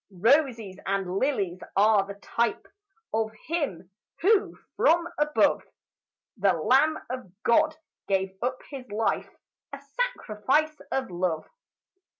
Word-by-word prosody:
Roses 235 Hz, -, +2 dB
and 195 Hz, -1 st, -1 dB
lilies 195 Hz, -10 st, -1 dB
are 205 Hz, -1 st, +4 dB
the 200 Hz, -, -7 dB
type 225 Hz, +2 st, -1 dB, 0.5 s
Of 220 Hz, 0 st, 0 dB
him 230 Hz, -, -3 dB, 0.3 s
who 415 Hz, +2 st, +3 dB, 0.2 s
from 340 Hz, +1 st, +3 dB
above, 300 Hz, 0 st, +3 dB, 0.8 s
The 195 Hz, -1 st, +3 dB
lamb 270 Hz, -, +3 dB
of 255 Hz, -8 st, -6 dB
God, 310 Hz, +6 st, +3 dB, 0.3 s
gave 190 Hz, -1 st, 0 dB
up 255 Hz, +1 st, -1 dB
his 265 Hz, -3 st, -8 dB
life, 215 Hz, +2 st, -1 dB, 0.4 s
A -, -, -7 dB
sacrifice 310 Hz, -, -1 dB, 0.2 s
of 265 Hz, -7 st, -1 dB
love. 175 Hz, -2 st, -1 dB
230 Hz, 115 wpm, -27 LUFS, 195-300 Hz, 0.8 s, are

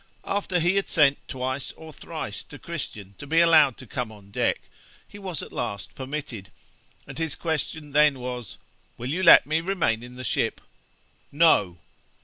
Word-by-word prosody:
After 195 Hz, -3 st, 0 dB
he 175 Hz, +4 st, +2 dB
had 195 Hz, -, +1 dB
sent 145 Hz, -4 st, +3 dB
twice 130 Hz, +1 st, -3 dB
or 160 Hz, -1 st, -12 dB
thrice -, -, -6 dB
to -, -, -11 dB
Christian 100 Hz, -1 st, -6 dB
to 140 Hz, -, -8 dB
be 165 Hz, +3 st, +3 dB
allowed 155 Hz, -6 st, +6 dB
to -, -, -11 dB
come 125 Hz, -3 st, -4 dB
on 100 Hz, -2 st, -15 dB
deck, -, -, 0 dB, 0.5 s
he 205 Hz, -, -12 dB
was 185 Hz, -6 st, -5 dB
at -, -, -11 dB
last 100 Hz, -6 st, -4 dB
permitted, 130 Hz, -7 st, -6 dB, 0.6 s
and -, -, -9 dB
his 160 Hz, -3 st, -1 dB
question 160 Hz, -2 st, -3 dB
then 150 Hz, -1 st, +4 dB
was, 125 Hz, -8 st, -6 dB, 0.4 s
"Will 125 Hz, +3 st, -4 dB
you 180 Hz, +5 st, -1 dB
let 180 Hz, -, +9 dB
me 155 Hz, +2 st, 0 dB
remain 170 Hz, -11 st, 0 dB
in 125 Hz, +1 st, -11 dB
the 130 Hz, -, -7 dB
ship?" 115 Hz, -, -1 dB, 0.7 s
"No." 140 Hz, -, +4 dB
140 Hz, 170 wpm, -25 LUFS, 120-165 Hz, 0.7 s, let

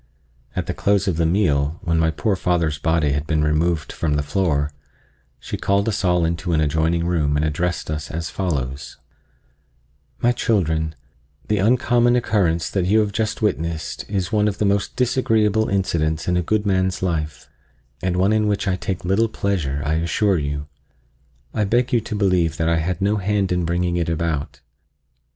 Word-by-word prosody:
At -, -, -1 dB
the -, -, -3 dB
close 100 Hz, 0 st, +1 dB
of 90 Hz, -4 st, 0 dB
the 85 Hz, -1 st, +2 dB
meal, 80 Hz, -4 st, +1 dB
when 85 Hz, -2 st, +1 dB
my 80 Hz, 0 st, +3 dB
poor 100 Hz, +5 st, 0 dB
father's 85 Hz, -5 st, 0 dB
body 80 Hz, -2 st, +1 dB
had 75 Hz, +2 st, -2 dB
been 75 Hz, -2 st, +1 dB
removed 80 Hz, +2 st, 0 dB
from 75 Hz, -3 st, -1 dB
the 75 Hz, -, 0 dB
floor, 75 Hz, -3 st, 0 dB, 0.7 s
she -, -, -5 dB
called 100 Hz, +2 st, +1 dB
us 105 Hz, -2 st, -1 dB
all 90 Hz, -2 st, +3 dB
into 85 Hz, +1 st, -1 dB
an 80 Hz, -, +3 dB
adjoining 80 Hz, +3 st, +1 dB
room 80 Hz, -5 st, +1 dB
and 75 Hz, -, +1 dB
addressed 85 Hz, +1 st, -2 dB
us 75 Hz, -1 st, -4 dB
as 85 Hz, +1 st, -4 dB
follows: 70 Hz, -7 st, -3 dB, 1.2 s
"My 120 Hz, -, +3 dB
children, 80 Hz, -10 st, 0 dB, 0.5 s
the 105 Hz, -1 st, +2 dB
uncommon 120 Hz, +2 st, +3 dB
occurrence 85 Hz, -9 st, +1 dB
that 95 Hz, -3 st, 0 dB
you 105 Hz, +3 st, +4 dB
have 105 Hz, -1 st, -1 dB
just 110 Hz, +1 st, -2 dB
witnessed 85 Hz, -6 st, -2 dB
is 95 Hz, -2 st, -2 dB
one 105 Hz, -1 st, +2 dB
of 105 Hz, -1 st, -2 dB
the 105 Hz, -, 0 dB
most 100 Hz, 0 st, 0 dB
disagreeable 110 Hz, -4 st, +2 dB
incidents 80 Hz, -5 st, 0 dB
in 90 Hz, -, +2 dB
a 90 Hz, -, +2 dB
good 105 Hz, +4 st, 0 dB
man's 95 Hz, -1 st, 0 dB
life, 80 Hz, -4 st, -2 dB, 0.5 s
and 90 Hz, -1 st, -1 dB
one 95 Hz, +3 st, +3 dB
in 110 Hz, -1 st, +2 dB
which 100 Hz, -1 st, 0 dB
I 95 Hz, -1 st, +1 dB
take 95 Hz, -1 st, -4 dB
little 105 Hz, +5 st, +2 dB
pleasure, 80 Hz, -10 st, -2 dB
I 80 Hz, +2 st, +1 dB
assure 90 Hz, +3 st, +1 dB
you. 75 Hz, 0 st, -3 dB, 0.9 s
I 110 Hz, -, 0 dB
beg 120 Hz, +5 st, +1 dB
you 120 Hz, -, +4 dB
to 110 Hz, 0 st, -5 dB
believe 90 Hz, -5 st, +1 dB
that 80 Hz, -, 0 dB
I 85 Hz, 0 st, +2 dB
had 90 Hz, +3 st, -2 dB
no 105 Hz, +2 st, +2 dB
hand 100 Hz, -1 st, 0 dB
in 90 Hz, -1 st, +1 dB
bringing 85 Hz, +1 st, 0 dB
it 85 Hz, -1 st, -1 dB
about. 80 Hz, -3 st, -2 dB
90 Hz, 180 wpm, -21 LUFS, 80-100 Hz, 1.2 s, you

